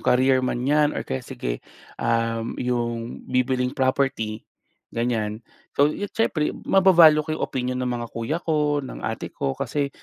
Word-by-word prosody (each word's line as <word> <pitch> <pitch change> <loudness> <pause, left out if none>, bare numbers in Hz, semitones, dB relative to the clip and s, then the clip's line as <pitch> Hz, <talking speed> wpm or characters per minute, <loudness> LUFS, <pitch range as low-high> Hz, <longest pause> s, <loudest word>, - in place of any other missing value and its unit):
career 130 +1 +3
man 125 -1 -1
'yan 150 0 +4
or - - -1
kaya 65 - -3
sige, - - -4 0.4
um, 115 0 0
'yong 120 -1 -2
bibilhing 125 0 +1
property, 130 -5 0 0.5
ganyan. 115 -2 -1 0.4
So, 145 +1 +5 0.2
siyempre 165 -9 +1
mava-value 170 -5 +6
ko - - -20
'yong 155 - -1
opinyon 125 -1 -2
ng 125 - -1
mga 120 -1 -3
kuya 115 +7 -2
ko, 150 -3 +1
ng - - -8
ate - - -3
ko, 70 - -2
kasi 145 -1 -1
125 Hz, 150 wpm, -24 LUFS, 115-145 Hz, 0.5 s, mava-value